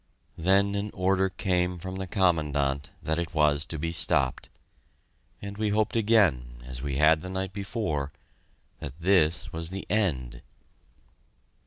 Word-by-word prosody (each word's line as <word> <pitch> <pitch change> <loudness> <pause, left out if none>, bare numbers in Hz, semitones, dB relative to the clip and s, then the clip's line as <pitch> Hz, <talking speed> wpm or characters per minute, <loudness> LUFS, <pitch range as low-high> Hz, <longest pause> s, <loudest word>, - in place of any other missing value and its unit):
Then 100 +4 +3
an 100 +1 -2
order 95 +1 +2
came 90 -1 0
from 95 +2 -6
the 95 0 -4
Commandant 75 -7 +1
that 80 +2 -1
it 85 -1 -4
was 75 -1 +3
to 80 - -6
be 80 +2 -2
stopped 70 -5 +2 0.9
and 100 +1 -7
we 110 -1 +1
hoped 105 +2 0
again, 80 - +2
as 65 -1 -6
we 70 -1 -3
had 75 +2 +4
the 95 - -6
night 95 0 -3
before, 100 - -3 0.7
that 70 +3 -8
this 85 -2 +2
was 80 0 -3
the 95 +1 -6
end. 65 - 0
85 Hz, 145 wpm, -27 LUFS, 75-95 Hz, 0.9 s, had